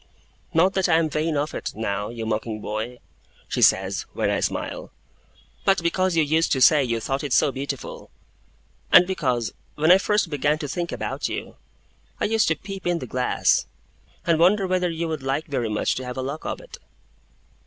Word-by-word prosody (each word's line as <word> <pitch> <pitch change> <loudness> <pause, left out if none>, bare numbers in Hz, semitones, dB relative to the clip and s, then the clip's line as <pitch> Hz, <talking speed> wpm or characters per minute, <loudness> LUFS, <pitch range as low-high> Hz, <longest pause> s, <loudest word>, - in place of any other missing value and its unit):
'Not 180 +4 +3
that 190 -2 +1
I 160 - +5
am 160 -2 +1
vain 155 0 0
of 150 +2 -1
it, - - -4
now, 105 -2 -2
you 115 -1 -5
mocking 110 0 -2
boy,' 110 +4 -4 0.5
she - - -2
says, - - +3
when - - 0
I - - +1
smile; - - -3 0.7
'but 195 -3 +2
because 185 +1 +1
you 160 - +4
used 160 +3 +1
to 135 - 0
say 145 +2 +6
you 115 -2 -1
thought 135 +5 -2
it 145 - -4
so 140 - +4
beautiful; 135 0 -6 0.8
and 180 - +8
because, 130 - -1 0.2
when 155 +3 +4
I 185 - +8
first 205 -4 +1
began 145 +1 +1
to 150 -2 -5
think 170 +5 -3
about - - -3
you, - - -5 0.6
I - - +1
used 220 0 +2
to 160 - +2
peep 195 +2 -7
in 175 -1 +2
the 145 - -5
glass, 125 +1 +1 0.6
and 165 -2 +2
wonder 195 +4 +4
whether 185 -1 +1
you 165 0 -3
would 155 -3 -3
like 135 +3 -1
very 125 -7 -2
much 105 - 0
to 130 - -4
have 125 +1 -6
a 130 - -2
lock 140 +4 -5
of - - -3
it. - - -12
155 Hz, 195 wpm, -24 LUFS, 130-175 Hz, 0.8 s, and